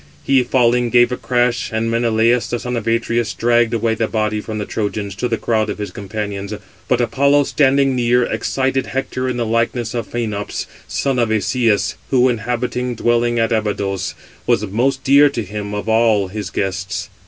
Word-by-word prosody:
He, 135 Hz, -1 st, +4 dB
falling, 120 Hz, -1 st, +2 dB
gave 120 Hz, +1 st, +4 dB
a -, -, 0 dB
crash, 120 Hz, -2 st, 0 dB
and 110 Hz, +1 st, -1 dB
Menelaus, 115 Hz, +1 st, +2 dB
the 120 Hz, -, -1 dB
son 125 Hz, +1 st, -4 dB
of 115 Hz, -1 st, -4 dB
Atreus, 115 Hz, -1 st, 0 dB
dragged 120 Hz, -1 st, +2 dB
away 115 Hz, -1 st, +1 dB
the 110 Hz, 0 st, -1 dB
body 105 Hz, -1 st, -1 dB
from 110 Hz, 0 st, -5 dB
the 105 Hz, -, -3 dB
Trojans 105 Hz, -2 st, -3 dB
to 115 Hz, +5 st, -2 dB
the 115 Hz, -1 st, -1 dB
crowd 110 Hz, -2 st, 0 dB
of -, -, -3 dB
his 105 Hz, -3 st, -5 dB
companions. 100 Hz, 0 st, -5 dB, 0.3 s
But 125 Hz, -1 st, +2 dB
Apollo, 140 Hz, +5 st, +3 dB
standing 135 Hz, -1 st, +2 dB
near, 125 Hz, 0 st, +3 dB
excited 135 Hz, +2 st, -1 dB
Hector 130 Hz, -1 st, -2 dB
in 125 Hz, -, -2 dB
the 120 Hz, -, -1 dB
likeness 115 Hz, +1 st, -1 dB
of 115 Hz, -3 st, -4 dB
Phœnops, 105 Hz, -4 st, -3 dB, 0.2 s
son 135 Hz, -2 st, -1 dB
of 120 Hz, -2 st, +2 dB
Asias, 110 Hz, 0 st, +1 dB
who, 130 Hz, -1 st, +4 dB
inhabiting 125 Hz, +1 st, -2 dB
dwellings 120 Hz, 0 st, +1 dB
at 115 Hz, +1 st, 0 dB
Abydos, 100 Hz, -3 st, -1 dB, 0.3 s
was 105 Hz, -, +2 dB
most 130 Hz, +7 st, 0 dB
dear 140 Hz, +2 st, +6 dB
to 120 Hz, -5 st, -3 dB
him 105 Hz, +1 st, -5 dB
of 105 Hz, -, -4 dB
all 110 Hz, -3 st, +3 dB
his 100 Hz, -1 st, -5 dB
guests. 95 Hz, 0 st, -3 dB
115 Hz, 180 wpm, -18 LUFS, 105-125 Hz, 0.3 s, dear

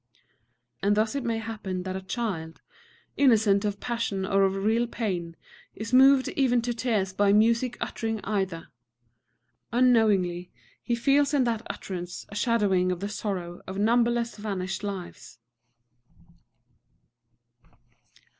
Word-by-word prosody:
And 205 Hz, +1 st, +2 dB
thus 215 Hz, 0 st, +1 dB
it 280 Hz, -2 st, -3 dB
may 230 Hz, -2 st, -1 dB
happen 210 Hz, -5 st, -5 dB
that 185 Hz, 0 st, -4 dB
a 190 Hz, -, -4 dB
child, 190 Hz, -6 st, -4 dB, 0.6 s
innocent 220 Hz, -7 st, +4 dB
of 205 Hz, -1 st, -2 dB
passion 230 Hz, -5 st, -2 dB
or 195 Hz, +1 st, +2 dB
of 190 Hz, 0 st, 0 dB
real 220 Hz, +5 st, +1 dB
pain, 180 Hz, -8 st, -3 dB, 0.4 s
is 225 Hz, +3 st, -6 dB
moved 265 Hz, +1 st, +6 dB
even 250 Hz, -3 st, +2 dB
to 240 Hz, 0 st, -1 dB
tears 220 Hz, -6 st, -1 dB
by 200 Hz, +1 st, +3 dB
music 230 Hz, +4 st, +3 dB
uttering 225 Hz, -1 st, -3 dB
either. 190 Hz, -5 st, -2 dB, 1.0 s
Unknowingly 210 Hz, -8 st, +2 dB, 0.3 s
he 240 Hz, -, -1 dB
feels 280 Hz, +4 st, +2 dB
in 275 Hz, -, +3 dB
that 230 Hz, -2 st, -2 dB
utterance 180 Hz, -2 st, -6 dB
a 205 Hz, -, -10 dB
shadowing 205 Hz, -5 st, +2 dB
of 180 Hz, -, -3 dB
the 200 Hz, +2 st, -4 dB
sorrow 185 Hz, -5 st, -4 dB
of 190 Hz, -, -6 dB
numberless 235 Hz, +2 st, +1 dB
vanished 190 Hz, -3 st, -4 dB
lives. 195 Hz, -10 st, -7 dB
210 Hz, 125 wpm, -26 LUFS, 190-235 Hz, 1.0 s, moved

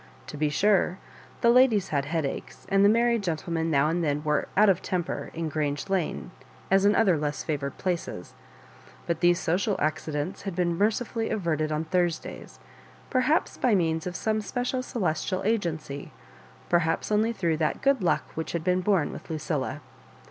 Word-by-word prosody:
To -, -, -8 dB
be 150 Hz, 0 st, +1 dB
sure, 190 Hz, +2 st, +2 dB, 0.4 s
the 235 Hz, -, +5 dB
ladies 240 Hz, -5 st, +4 dB
had 140 Hz, -2 st, 0 dB
headaches, 155 Hz, -2 st, -4 dB
and 195 Hz, 0 st, +4 dB
the 200 Hz, -, +7 dB
married 235 Hz, +1 st, +3 dB
gentlemen 165 Hz, -2 st, -2 dB
now 145 Hz, -1 st, +3 dB
and 170 Hz, +2 st, 0 dB
then 150 Hz, -1 st, 0 dB
were 150 Hz, -1 st, 0 dB
out 215 Hz, +1 st, +6 dB
of 190 Hz, -3 st, +3 dB
temper 180 Hz, -2 st, -3 dB
in 165 Hz, 0 st, -2 dB
Grange 145 Hz, +1 st, -2 dB
Lane 150 Hz, -, -1 dB, 0.4 s
as 195 Hz, +1 st, +4 dB
in 205 Hz, 0 st, +5 dB
other 185 Hz, -8 st, +3 dB
less 150 Hz, 0 st, -2 dB
favoured 140 Hz, -3 st, -3 dB
places; 175 Hz, -, -3 dB, 0.7 s
but 170 Hz, -2 st, -1 dB
these 175 Hz, 0 st, +4 dB
social 190 Hz, +5 st, 0 dB
accidents 155 Hz, +1 st, -2 dB
had 195 Hz, -3 st, -5 dB
been 175 Hz, -1 st, +1 dB
mercifully 225 Hz, +3 st, 0 dB
averted 160 Hz, -7 st, -1 dB
on 155 Hz, +1 st, -1 dB
Thursdays, 175 Hz, -1 st, -2 dB, 0.5 s
perhaps 260 Hz, +5 st, +1 dB
by 240 Hz, -4 st, +3 dB
means 160 Hz, -2 st, 0 dB
of 180 Hz, -, -5 dB
some 215 Hz, +2 st, 0 dB
special 245 Hz, +5 st, -2 dB
celestial 185 Hz, -5 st, -2 dB
agency, 165 Hz, -10 st, -2 dB, 0.6 s
perhaps 170 Hz, +2 st, +1 dB
only 215 Hz, +2 st, +3 dB
through 170 Hz, -8 st, 0 dB
that 155 Hz, -1 st, -1 dB
good 275 Hz, -3 st, +3 dB
luck 175 Hz, -, +2 dB
which 160 Hz, -, -4 dB
had 170 Hz, -2 st, -2 dB
been 180 Hz, +1 st, +2 dB
bom 185 Hz, -5 st, +1 dB
with -, -, -10 dB
Lucilla. 155 Hz, -3 st, -3 dB
175 Hz, 170 wpm, -27 LUFS, 155-205 Hz, 0.7 s, the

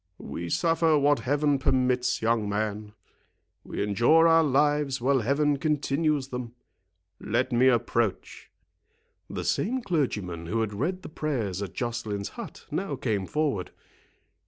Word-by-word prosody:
"We 85 Hz, 0 st, -6 dB
suffer 165 Hz, -, +2 dB
what 145 Hz, 0 st, +3 dB
Heaven 145 Hz, +1 st, +1 dB
permits, 125 Hz, -2 st, +1 dB
young 110 Hz, -2 st, +1 dB
man; 105 Hz, 0 st, -3 dB, 0.7 s
we -, -, -3 dB
endure 120 Hz, +11 st, +4 dB
our 165 Hz, 0 st, +5 dB
lives 145 Hz, -1 st, +2 dB
while 135 Hz, +2 st, +2 dB
Heaven 140 Hz, +5 st, +1 dB
continues 150 Hz, -1 st, 0 dB
them. 125 Hz, -2 st, -6 dB, 0.6 s
Let 120 Hz, +5 st, -1 dB
me 125 Hz, +2 st, +4 dB
approach." 120 Hz, -4 st, 0 dB, 0.8 s
The -, -, -4 dB
same 255 Hz, +5 st, 0 dB
clergyman 105 Hz, -, -2 dB
who 115 Hz, +6 st, 0 dB
had 105 Hz, -2 st, -2 dB
read 175 Hz, -, -2 dB
the -, -, -8 dB
prayers 120 Hz, -, -2 dB
at 100 Hz, -4 st, -6 dB
Joceline's 115 Hz, -4 st, -3 dB
hut -, -, -9 dB
now -, -, -2 dB
came 100 Hz, -4 st, -2 dB
forward. 145 Hz, -12 st, -1 dB
130 Hz, 135 wpm, -27 LUFS, 110-150 Hz, 0.8 s, our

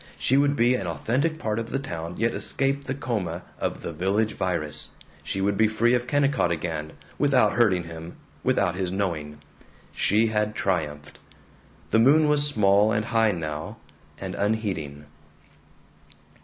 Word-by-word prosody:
She 130 Hz, -, +2 dB
would 140 Hz, +1 st, +3 dB
be 120 Hz, -1 st, +3 dB
an 100 Hz, -7 st, -2 dB
authentic 125 Hz, -, -1 dB
part 110 Hz, -7 st, -2 dB
of 115 Hz, 0 st, -5 dB
the -, -, -1 dB
town, 85 Hz, -9 st, -5 dB
yet 115 Hz, +1 st, +1 dB
escape 135 Hz, +1 st, -1 dB
the 130 Hz, -, -3 dB
coma 95 Hz, -, -3 dB, 0.2 s
of -, -, -3 dB
the -, -, -4 dB
Village 100 Hz, +6 st, 0 dB
Virus.... 85 Hz, -5 st, -2 dB, 0.3 s
She 95 Hz, -, -3 dB
would 100 Hz, 0 st, +1 dB
be 110 Hz, -, +4 dB
free 115 Hz, +3 st, +2 dB
of 125 Hz, 0 st, 0 dB
Kennicott 140 Hz, -7 st, +2 dB
again, 80 Hz, -2 st, -3 dB, 0.3 s
without 130 Hz, -7 st, +3 dB
hurting 95 Hz, -5 st, +3 dB
him, 85 Hz, 0 st, -9 dB, 0.3 s
without 90 Hz, -, +2 dB
his 90 Hz, -1 st, -2 dB
knowing. 85 Hz, -6 st, -3 dB, 0.5 s
She 110 Hz, +3 st, +2 dB
had 105 Hz, 0 st, 0 dB
triumphed. 75 Hz, -8 st, -2 dB, 0.7 s
The 110 Hz, -, +4 dB
moon 150 Hz, +6 st, +5 dB
was 145 Hz, -1 st, +4 dB
small 105 Hz, -4 st, +3 dB
and 105 Hz, 0 st, 0 dB
high 115 Hz, -2 st, +2 dB
now, 80 Hz, -3 st, -5 dB, 0.4 s
and -, -, -5 dB
unheeding. 95 Hz, -9 st, -2 dB
105 Hz, 155 wpm, -25 LUFS, 85-120 Hz, 0.7 s, moon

